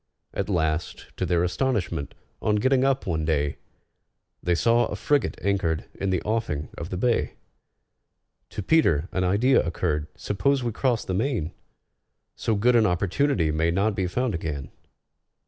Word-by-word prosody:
At - - -2
last, 80 -3 -1
to - - -1
their 85 -1 +2
astonishment, 95 - -1 0.3
on 105 - +2
getting 130 +5 +3
up 135 -1 +1
one 80 -4 -1
day, 75 -2 0 0.8
They 90 0 +1
saw 115 +6 +3
a - - -4
frigate 145 -4 0
anchored 95 -5 0
in 95 - -3
the 95 -2 0
offing 105 -10 -2
of 85 - -6
the 90 - -3
bay. 120 +4 +1 1.1
To 105 - -5
PETER 90 - +3
an 95 - 0
idea 105 +9 +4
occurred. 80 -3 -1
"Suppose 135 +6 0
we 120 - -1
cross 120 +1 0
the 95 - -3
main? 105 - -1 0.8
So 110 - 0
good 120 +4 +3
an 110 -2 +5
opportunity 90 - +1
may 80 +2 +1
not 100 +5 +1
be 95 -2 -1
found 125 +5 -1
again." 75 -5 -4
95 Hz, 155 wpm, -25 LUFS, 85-120 Hz, 1.1 s, an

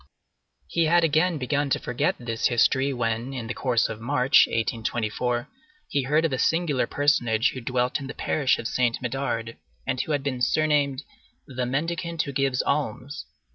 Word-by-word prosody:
He 170 -1 +1
had 170 +2 +4
again 165 +2 +2
begun 145 +2 -1
to - - +1
forget 125 - -1
this 115 -2 -1
history, 130 +3 +2
when, 120 0 -2
in 120 -3 -4
the 115 - -4
course 120 -4 +1
of 110 - -7
March, 130 +2 +4
1824, 115 +1 -1 0.4
he 140 - +1
heard 155 +4 +2
of 155 - 0
a 130 - -1
singular 160 -5 +1
personage 125 -6 +2
who 130 - -7
dwelt 125 +1 0
in 135 - -7
the - - -7
parish 140 -4 +1
of 115 - -4
Saint 120 +1 0
Médard 120 -3 -3 0.3
and 130 -1 -1
who 155 - -4
had 145 -2 -1
been 130 -3 -3
surnamed 145 -1 +1 0.4
"the 130 -2 -3
mendicant 165 +5 -2
who 140 - -5
gives 135 -1 0
alms." 140 -1 -2
130 Hz, 175 wpm, -25 LUFS, 120-145 Hz, 0.4 s, had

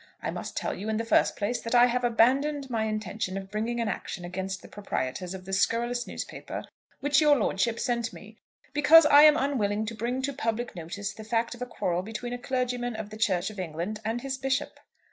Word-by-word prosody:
I - - -3
must - - -6
tell - - -1
you, 210 +3 -5
in 220 - 0
the 230 - -2
first - - +3
place, 215 +4 -2
that 230 +2 -2
I 240 0 +8
have 250 0 0
abandoned 265 +4 +2
my 220 -2 0
intention 215 -2 -3
of 195 0 -7
bringing 225 +3 -2
an 230 - 0
action 180 -3 -4
against 190 +2 -4
the - - -10
proprietors 180 -2 -4
of 185 -1 -9
the 195 - -6
scurrilous 240 +5 +1
newspaper - - -6 0.4
which 290 0 +3
your 300 -1 +6
lordship 225 +1 0
sent 235 -3 -1
me, 215 +2 -13 0.3
because 295 +2 +7
I 290 -1 +8
am 305 0 +7
unwilling 220 -7 0
to 225 - -4
bring 240 +4 -2
to 280 +1 -1
public 240 -3 -2
notice 195 +4 -5
the 220 - -10
fact 230 +2 0
of 240 - -12
a 250 - -3
quarrel 180 -7 -1
between 225 +4 -5
a 245 - -4
clergyman 245 -2 -2
of 215 -1 -6
the - - -7
Church 195 -3 +1
of 205 - -10
England 180 +5 -4
and 225 +2 -2
his 265 0 -4
Bishop. 270 +1 -1
230 Hz, 220 wpm, -28 LUFS, 205-250 Hz, 0.4 s, I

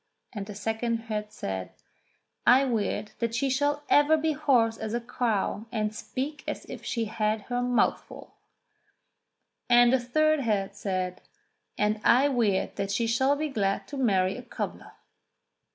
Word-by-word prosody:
And 205 -3 -5
the 205 - -8
second 225 +2 -2
head 210 -2 -4
said: 95 - -5 0.7
"I 260 +3 +7
weird 215 -3 -1
that 230 -1 -1
she 270 +3 0
shall 290 +2 0
ever 295 +2 +5
be 315 +1 0
hoarse 255 -7 +2
as 220 +1 -4
a - - 0
crow 230 -3 -2
and 215 -1 -1
speak 275 +6 -5
as - - -4
if - - -9
she 230 -2 -2
had 215 0 -1
her 245 +3 -2
mouth 245 -1 +2
full." - - -12 1.4
Then 240 0 +6
the 260 - +4
third 310 +5 +2
head 205 -6 -1
said: 185 -2 -3 0.6
"And 210 +1 +1
I 265 +4 +5
weird 225 -8 0
that 195 - -2
she 215 +4 0
shall 265 +5 +2
be 305 +1 -2
glad 200 -6 -1
to 290 - -6
marry 195 -7 +2
a - - -6
cobbler." 245 - -6
230 Hz, 160 wpm, -27 LUFS, 210-260 Hz, 1.4 s, I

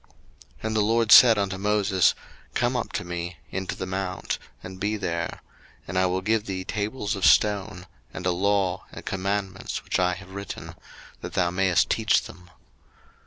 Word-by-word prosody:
02:024:012 - - -31 0.5
And 110 0 -2
the 110 - +3
LORD 115 +1 +2
said 115 -3 +9
unto 100 -2 -1
Moses, 100 -2 +2 0.4
Come - - +1
up - - -2
to - - -2
me 85 0 -5
into 95 0 -3
the - - -4
mount, 95 0 -3 0.2
and 95 0 -9
be 105 +2 -1
there: 85 -4 -3 0.4
and 85 - -6
I 95 0 +3
will 90 +1 -1
give 110 +1 0
thee 95 -1 -3
tables 105 +1 -2
of 100 - -6
stone, 100 -3 +3 0.3
and 90 - -7
a 90 - +3
law, 95 0 0
and - - -10
commandments 95 0 -3
which - - -1
I 90 0 +2
have 95 0 -12
written; 100 +1 -7 0.5
that - - -8
thou 85 -1 +1
mayest 95 -1 +2
teach - - +2
them. 90 -1 -13
95 Hz, 175 wpm, -25 LUFS, 90-105 Hz, 0.5 s, said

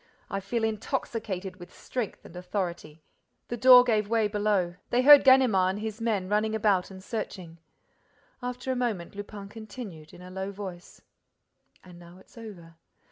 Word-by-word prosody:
I 195 - -1
feel 225 +4 -3
intoxicated 215 -4 -3
with 175 -1 -12
strength 245 -5 -5
and - - -13
authority." 175 -4 -5 0.5
The 240 - -2
door 250 +1 +8
gave 215 -4 0
way 225 -2 +2
below. 205 -4 0
They 245 +1 +2
heard 290 +1 +9
Ganimard 240 -9 +5
and - - -6
his 220 +1 -5
men 210 -5 -1
running 215 +2 0
about 205 -4 +1
and 190 -1 -11
searching. 185 -6 -6 0.8
After 250 +1 -4
a - - -1
moment, 225 -9 -2
Lupin 205 0 -8
continued, 210 -7 -10
in 180 - -13
a 180 - -11
low 190 +1 -4
voice: 190 -3 -9 0.8
"And 180 -2 -14
now 175 +1 -14
it's 190 - -20
over. 180 -8 -11
205 Hz, 160 wpm, -27 LUFS, 185-225 Hz, 0.8 s, heard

